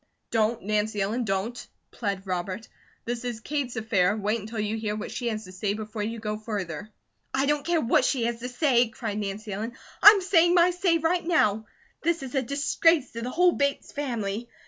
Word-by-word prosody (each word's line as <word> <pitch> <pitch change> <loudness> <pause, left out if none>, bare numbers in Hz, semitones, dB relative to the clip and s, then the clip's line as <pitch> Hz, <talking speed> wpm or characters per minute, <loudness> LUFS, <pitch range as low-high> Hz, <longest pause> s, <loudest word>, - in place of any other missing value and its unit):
"Don't, 225 0 +1
Nancy 210 +1 0
Ellen, 220 +5 0
don't!" 215 +5 -2 0.2
plead 200 -3 -3
Robert. 185 +3 -3 0.4
"This 240 +1 -3
is 240 -3 -4
Kate's 270 0 -3
affair, 210 -3 +1
wait 210 +2 0
until 220 +2 -6
you 215 +1 -1
hear 215 -1 -2
what 215 - -5
she 245 - -3
has 220 -2 -2
to 185 - -11
say 200 +2 -2
before 215 0 -5
you 225 +2 -3
go 215 -1 -3
further." 205 -3 -5 0.5
"I 270 +1 +2
don't 295 0 +1
care 340 0 +1
what 230 - +3
she 255 -4 +1
has 235 0 -1
to 250 +2 -5
say!" 250 -2 +3
cried 220 -2 -4
Nancy 205 +1 -4
Ellen. 220 +4 -4 0.3
"I'm 410 0 +10
saying 350 -2 +4
my 350 +1 +5
say 355 -1 +2
right 330 +2 +1
now. 220 - +2 0.3
This 335 -2 0
is 265 - -7
a 270 - +2
disgrace 280 +3 +2
to 230 - -6
the 245 - -3
whole 360 +6 +4
Bates 280 -3 -1
family. 235 -5 -3
230 Hz, 200 wpm, -26 LUFS, 210-280 Hz, 0.5 s, I'm